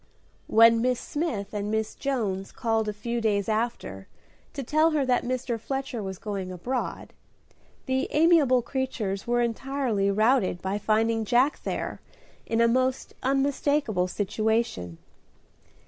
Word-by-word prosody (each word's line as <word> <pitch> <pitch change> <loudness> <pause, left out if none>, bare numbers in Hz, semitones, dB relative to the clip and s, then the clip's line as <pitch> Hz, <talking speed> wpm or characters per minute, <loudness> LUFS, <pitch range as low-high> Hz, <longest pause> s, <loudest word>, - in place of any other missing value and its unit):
When 230 +1 +6
Miss 250 0 +1
Smith 230 -11 -3
and 205 0 -2
Miss 220 0 -1
Jones 210 -9 -2
called 225 -2 0
a - - 0
few 235 +3 -3
days 205 -3 +1
after 215 - -2 0.5
to 275 - -4
tell 310 +5 +3
her 300 -4 +1
that 250 -1 +2
Mr. 245 -1 -2
Fletcher 270 -1 -4
was 190 -2 -5
going 195 -3 -4
abroad, 240 +8 -4 0.7
the 265 0 0
amiable 300 -6 +4
creatures 235 -7 -3
were 240 0 +2
entirely 235 -4 -1
routed 215 -2 +2
by 190 +3 -2
finding 225 +2 +1
Jack 250 +7 +2
there - - -4 0.5
in 225 0 +1
a 235 - +5
most 255 +2 0
unmistakable 270 -6 +1
situation. 205 - -1
230 Hz, 130 wpm, -26 LUFS, 205-260 Hz, 0.7 s, When